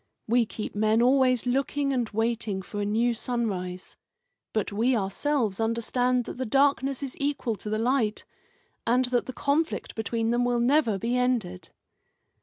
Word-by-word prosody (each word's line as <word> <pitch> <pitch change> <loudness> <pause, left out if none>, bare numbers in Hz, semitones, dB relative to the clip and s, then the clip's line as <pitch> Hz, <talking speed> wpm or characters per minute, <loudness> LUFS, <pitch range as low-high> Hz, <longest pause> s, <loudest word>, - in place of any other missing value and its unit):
We 235 0 +3
keep 215 - -6
men 215 +1 +2
always 255 0 +3
looking 275 +2 0
and 245 -4 -1
waiting 225 -3 -1
for 205 +2 -5
a - - -1
new 230 +4 +1
sunrise. 200 -7 -3 0.6
But 215 -2 -1
we 235 +5 +2
ourselves 215 +2 -1
understand 245 +2 +1
that - - -7
the 260 - -2
darkness 275 +1 +2
is 270 - -5
equal 280 -5 -1
to 210 - -6
the 215 - 0
light, 230 -2 0 0.6
and 250 +2 +3
that 245 -1 0
the - - -3
conflict 290 +5 -1
between 225 +1 -1
them 240 +1 +2
will 245 -1 +1
never 240 -3 +3
be 230 +5 -1
ended." 235 -8 -1
235 Hz, 160 wpm, -27 LUFS, 215-255 Hz, 0.6 s, We